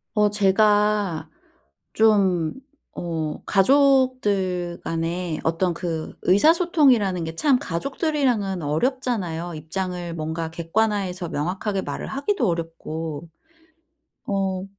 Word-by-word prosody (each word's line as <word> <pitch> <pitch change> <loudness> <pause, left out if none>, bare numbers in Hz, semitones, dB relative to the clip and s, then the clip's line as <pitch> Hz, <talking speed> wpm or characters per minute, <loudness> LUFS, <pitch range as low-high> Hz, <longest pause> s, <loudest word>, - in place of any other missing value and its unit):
어 210 0 +4
제가 205 -2 +2 0.6
좀 195 -7 +3 0.4
어 160 -3 -4
가족들 205 -7 +2
간에 165 0 -2
어떤 170 +2 0
그 165 -2 -4
의사소통이라는 250 - +3
게 160 0 -5
참 270 - +3
가족들이랑은 245 - -1
어렵잖아요. 175 - -1
입장을 175 +2 -4
뭔가 160 +1 -3
객관화해서 185 +1 -1
명확하게 190 +6 -2
말을 - - -5
하기도 280 - -1
어렵고. 165 -2 -4 1.0
어 190 -2 -1
190 Hz, 225 characters per minute, -23 LUFS, 165-215 Hz, 1.0 s, 어